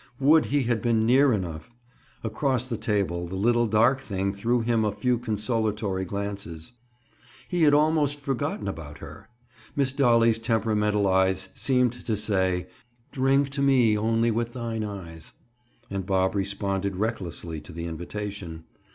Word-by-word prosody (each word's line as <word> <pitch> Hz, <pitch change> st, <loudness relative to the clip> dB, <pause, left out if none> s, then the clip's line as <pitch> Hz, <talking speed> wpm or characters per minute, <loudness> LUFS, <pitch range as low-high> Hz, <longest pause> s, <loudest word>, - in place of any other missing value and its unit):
Would 150 Hz, +3 st, +5 dB
he 145 Hz, -1 st, +1 dB
had 120 Hz, -2 st, 0 dB
been 115 Hz, -2 st, +2 dB
near 130 Hz, +4 st, +5 dB
enough! 85 Hz, -6 st, -3 dB, 0.5 s
Across 125 Hz, +3 st, 0 dB
the 125 Hz, -2 st, -3 dB
table, 95 Hz, -6 st, -1 dB
the 90 Hz, -, -6 dB
little 120 Hz, +4 st, +2 dB
dark 115 Hz, +5 st, +3 dB
thing 100 Hz, -4 st, -2 dB
threw 115 Hz, +4 st, 0 dB
him 115 Hz, -1 st, +1 dB
a 105 Hz, -, +1 dB
few 120 Hz, +4 st, 0 dB
consolatory 105 Hz, -3 st, -1 dB
glances. 100 Hz, -4 st, -5 dB, 0.8 s
He 180 Hz, -2 st, -1 dB
had 145 Hz, -2 st, +6 dB
almost 150 Hz, -1 st, +2 dB
forgotten 135 Hz, -7 st, -3 dB
about 80 Hz, -6 st, -6 dB
her. -, -, -11 dB, 0.5 s
Miss 135 Hz, -2 st, +1 dB
Dolly's 115 Hz, -5 st, +4 dB
temperamental 105 Hz, -3 st, +1 dB
eyes 95 Hz, 0 st, +2 dB
seemed 125 Hz, 0 st, +1 dB
to 115 Hz, -3 st, -3 dB
say 95 Hz, -4 st, 0 dB, 0.5 s
"Drink 135 Hz, +1 st, +2 dB
to 140 Hz, +1 st, -3 dB
me 130 Hz, -6 st, +4 dB
only 115 Hz, +2 st, +1 dB
with 115 Hz, +1 st, -2 dB
thine 115 Hz, -3 st, -3 dB
eyes," 90 Hz, -6 st, -8 dB, 0.6 s
and 100 Hz, -1 st, -2 dB
Bob 95 Hz, 0 st, +1 dB
responded 100 Hz, -1 st, -1 dB
recklessly 90 Hz, -6 st, -4 dB
to 75 Hz, -, -9 dB
the 85 Hz, 0 st, -6 dB
invitation. 85 Hz, 0 st, -6 dB
110 Hz, 145 wpm, -26 LUFS, 95-120 Hz, 0.8 s, had